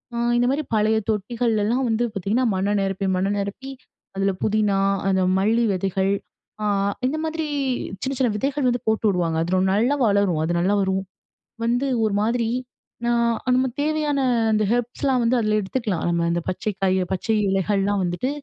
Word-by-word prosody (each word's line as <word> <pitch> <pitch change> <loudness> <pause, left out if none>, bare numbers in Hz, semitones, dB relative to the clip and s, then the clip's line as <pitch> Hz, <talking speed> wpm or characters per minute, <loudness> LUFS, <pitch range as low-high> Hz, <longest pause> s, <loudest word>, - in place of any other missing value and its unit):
அ - - -2 0.2
இந்த 245 - +3
மாரி 290 +2 -1
பழைய 220 +1 +2
தொட்டிகள்லலாம், 225 +3 0
வந்து 225 +1 +1
பாத்தீங்கன்னா, 210 +7 0
மண்ண 195 +2 0
நிரப்பி, 195 0 -1
மண்ண 190 +2 0
நிரப்பி 200 +7 -5 0.4
அதுல 195 0 +1
புதினா, 210 -2 +2 0.3
அந்த 190 -1 +2 0.2
மல்லி 225 +4 +2
விதைகள். 190 +1 0 0.5
அ - - 0 0.4
இந்த 295 +4 -2
மாதிரி 320 0 -2 0.6
சின்ன, 270 +1 -2
சின்ன 255 -2 +3
விதைகள் 275 +4 -1
வந்து 245 0 0
போட்டுவுடுவாங்க. 180 -7 +1
அது 175 +2 -3
ரொ - - +3
நல்லா 235 +8 +2
வளரும். 200 -5 +2
அது 170 - -1
நல்லா 190 +4 +2
வரும், 190 0 0 0.6
வந்து 245 +4 +1 0.2
ஒரு 215 - 0
மாரி 230 0 0 0.6
நான் 235 -1 +2 0.2
நம்ப 260 +1 +2
தேவையான 300 -1 0 0.3
அந்த 215 0 +2
ஹெர்ப்ஸ்லாம் 245 +2 0
வந்து 230 +2 +2
அதுல 215 -1 +1
எடுத்துக்கலாம். 200 -3 -2
நம்ப 170 0 +1
இந்த 170 0 0
பச்சை 210 +4 -2
காய், 190 -1 +2
பச்சை 205 +4 0
இலைகள்லாம் 195 +1 +1
வந்துட்டு. 175 +8 -1
215 Hz, 160 wpm, -23 LUFS, 195-245 Hz, 0.6 s, இந்த